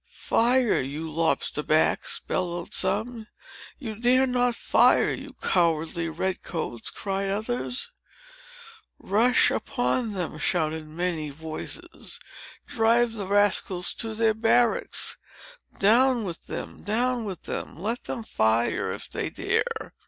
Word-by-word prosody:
"Fire, 245 Hz, 0 st, +2 dB
you 145 Hz, +5 st, -5 dB
lobster 160 Hz, -1 st, 0 dB
backs!" 155 Hz, +1 st, +2 dB
bellowed 175 Hz, -2 st, -3 dB
some. 230 Hz, -2 st, -1 dB, 0.5 s
"You 230 Hz, -6 st, -6 dB
dare 245 Hz, +4 st, +3 dB
not 245 Hz, -1 st, +1 dB
fire, -, -, +4 dB
you -, -, -8 dB
cowardly 165 Hz, -1 st, +1 dB
red 185 Hz, +4 st, -2 dB
coats," 140 Hz, -9 st, -3 dB
cried 195 Hz, 0 st, -3 dB
others. 245 Hz, -, -2 dB, 1.1 s
"Rush 235 Hz, +6 st, +3 dB
upon 245 Hz, -3 st, -1 dB
them!" 175 Hz, -5 st, -4 dB
shouted 160 Hz, -1 st, 0 dB
many 160 Hz, -1 st, -2 dB
voices. 155 Hz, +2 st, -7 dB, 0.5 s
"Drive 230 Hz, +1 st, +2 dB
the 205 Hz, -4 st, -5 dB
rascals 200 Hz, -2 st, +2 dB
to 225 Hz, -2 st, -4 dB
their 220 Hz, 0 st, +3 dB
barracks! 240 Hz, -, +2 dB, 0.6 s
Down 240 Hz, +4 st, +4 dB
with 175 Hz, -4 st, -7 dB
them! -, -, -6 dB
Down 240 Hz, +3 st, +1 dB
with 195 Hz, -5 st, -6 dB
them! -, -, -5 dB
Let 225 Hz, +6 st, -2 dB
them 230 Hz, -, -4 dB
fire, 115 Hz, -, +1 dB
if -, -, -6 dB
they -, -, -3 dB
dare!" -, -, -2 dB
205 Hz, 120 wpm, -26 LUFS, 165-235 Hz, 1.1 s, fire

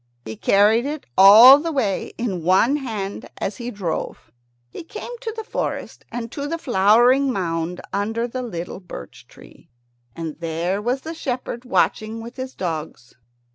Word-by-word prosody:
He 110 Hz, 0 st, -6 dB
carried 210 Hz, -, +3 dB
it 300 Hz, 0 st, -5 dB
all 225 Hz, +8 st, +10 dB
the 330 Hz, +2 st, -3 dB
way 230 Hz, -10 st, -1 dB
in 205 Hz, -7 st, -3 dB
one 190 Hz, -, +3 dB
hand 215 Hz, -8 st, -5 dB
as 200 Hz, -, -4 dB
he 240 Hz, -1 st, -5 dB
drove. 180 Hz, -, -5 dB, 0.4 s
He -, -, -8 dB
came 435 Hz, +7 st, -8 dB
to 460 Hz, -2 st, -4 dB
the 445 Hz, -, -4 dB
forest -, -, -5 dB
and 235 Hz, -1 st, -5 dB
to 285 Hz, 0 st, -4 dB
the 330 Hz, +3 st, -3 dB
flowering 245 Hz, +3 st, +4 dB
mound 170 Hz, -4 st, -3 dB
under 225 Hz, +4 st, -1 dB
the 255 Hz, +2 st, -5 dB
little 180 Hz, -7 st, -6 dB
birch 175 Hz, -, -11 dB
tree, -, -, -18 dB, 0.5 s
and 160 Hz, -2 st, -6 dB
there 170 Hz, +4 st, -2 dB
was 250 Hz, +4 st, -1 dB
the 325 Hz, +3 st, -6 dB
shepherd 255 Hz, -5 st, -5 dB
watching 225 Hz, -3 st, 0 dB
with 235 Hz, +3 st, -10 dB
his 260 Hz, 0 st, -6 dB
dogs. 160 Hz, -8 st, -5 dB
225 Hz, 160 wpm, -22 LUFS, 185-260 Hz, 0.5 s, all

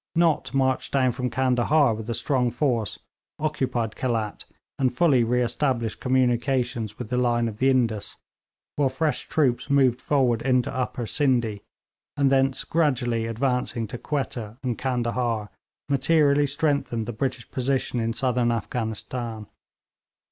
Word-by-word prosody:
Nott 165 Hz, -7 st, +2 dB
marched 130 Hz, -1 st, +1 dB
down 130 Hz, -2 st, +3 dB
from 125 Hz, +1 st, -3 dB
Candahar 130 Hz, +2 st, +2 dB
with 110 Hz, +1 st, -7 dB
a 115 Hz, -, 0 dB
strong 125 Hz, -2 st, +1 dB
force, 120 Hz, -4 st, -1 dB, 0.4 s
occupied 130 Hz, -7 st, -1 dB
Khelat, 115 Hz, -5 st, -2 dB, 0.3 s
and 130 Hz, -2 st, +2 dB
fully 130 Hz, -2 st, +3 dB
re 125 Hz, +2 st, +1 dB
established 120 Hz, -2 st, -1 dB
communications 125 Hz, -3 st, 0 dB
with 125 Hz, -2 st, -7 dB
the 125 Hz, -, +1 dB
line 120 Hz, -1 st, +2 dB
of 110 Hz, -2 st, -6 dB
the 130 Hz, +4 st, +3 dB
Indus, 115 Hz, -5 st, 0 dB, 0.6 s
while 140 Hz, -2 st, +3 dB
fresh 150 Hz, +3 st, -1 dB
troops 135 Hz, -3 st, +1 dB
moved 130 Hz, -3 st, +3 dB
forward 125 Hz, -5 st, +2 dB
into 125 Hz, -1 st, +1 dB
Upper 125 Hz, -1 st, -2 dB
Scinde, 120 Hz, -6 st, +1 dB, 0.6 s
and 140 Hz, -1 st, +3 dB
thence 135 Hz, 0 st, +2 dB
gradually 125 Hz, -8 st, 0 dB
advancing 120 Hz, 0 st, -1 dB
to 120 Hz, -, -6 dB
Quetta 120 Hz, -7 st, -4 dB
and 125 Hz, -2 st, -1 dB
Candahar, 120 Hz, -4 st, -1 dB, 0.4 s
materially 145 Hz, +1 st, +3 dB
strengthened 140 Hz, -5 st, 0 dB
the 120 Hz, -, -5 dB
British 130 Hz, +1 st, -3 dB
position 130 Hz, -1 st, -1 dB
in 115 Hz, 0 st, -1 dB
Southern 125 Hz, -2 st, +1 dB
Afghanistan. 115 Hz, 0 st, -3 dB
125 Hz, 135 wpm, -25 LUFS, 115-135 Hz, 0.6 s, down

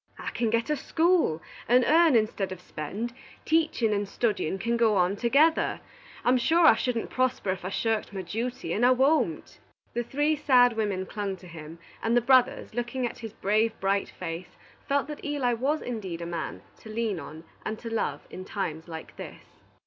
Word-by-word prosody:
I -, -, -5 dB
can 235 Hz, -1 st, 0 dB
get 230 Hz, +5 st, 0 dB
a -, -, +3 dB
school, 320 Hz, -, +1 dB, 0.2 s
and 250 Hz, +1 st, +5 dB
earn 325 Hz, -2 st, +5 dB
instead 215 Hz, -3 st, +1 dB
of 185 Hz, -, -6 dB
spend. 190 Hz, +8 st, -5 dB, 0.3 s
Teaching 310 Hz, -9 st, +2 dB
and 200 Hz, -1 st, -1 dB
studying 205 Hz, -7 st, -1 dB
can 235 Hz, +4 st, -1 dB
go 230 Hz, -3 st, +3 dB
on 180 Hz, +2 st, +2 dB
together. 280 Hz, +9 st, +3 dB, 0.5 s
I'm 250 Hz, +1 st, +4 dB
sure 325 Hz, +7 st, +4 dB
I -, -, +9 dB
shouldn't 235 Hz, 0 st, -2 dB
prosper 255 Hz, -6 st, 0 dB
if 185 Hz, -1 st, -5 dB
I 185 Hz, -, -3 dB
shirked 220 Hz, +1 st, -1 dB
my 195 Hz, -2 st, -5 dB
duty, 230 Hz, +7 st, -3 dB
and 225 Hz, -, 0 dB
I 250 Hz, -, +7 dB
won't." 260 Hz, -, +1 dB, 0.3 s
The 240 Hz, -, 0 dB
three 290 Hz, +6 st, +1 dB
sad 250 Hz, -5 st, +5 dB
women 205 Hz, -4 st, -1 dB
clung 200 Hz, -1 st, -3 dB
to 180 Hz, -, -14 dB
him, 160 Hz, -1 st, -10 dB, 0.2 s
and 230 Hz, +2 st, +2 dB
the -, -, +4 dB
brothers, 255 Hz, 0 st, +3 dB
looking 240 Hz, +2 st, -2 dB
at 240 Hz, -, -5 dB
his 225 Hz, -3 st, -7 dB
brave, 215 Hz, +3 st, +1 dB
bright 195 Hz, +1 st, 0 dB
face, 170 Hz, +2 st, -7 dB, 0.3 s
felt 280 Hz, 0 st, +1 dB
that 300 Hz, -1 st, -8 dB
Eli 285 Hz, -5 st, 0 dB
was 275 Hz, +7 st, 0 dB
indeed 195 Hz, -8 st, -5 dB
a -, -, -4 dB
man 170 Hz, -2 st, -5 dB, 0.2 s
to 220 Hz, -, -12 dB
lean 215 Hz, -4 st, -1 dB
on 155 Hz, +2 st, -9 dB, 0.2 s
and 220 Hz, -, -3 dB
to 230 Hz, 0 st, -7 dB
love 145 Hz, -10 st, -2 dB
in 185 Hz, -, -7 dB
times 175 Hz, -5 st, -4 dB
like 160 Hz, -1 st, -8 dB
this. -, -, -9 dB
225 Hz, 190 wpm, -27 LUFS, 190-255 Hz, 0.5 s, I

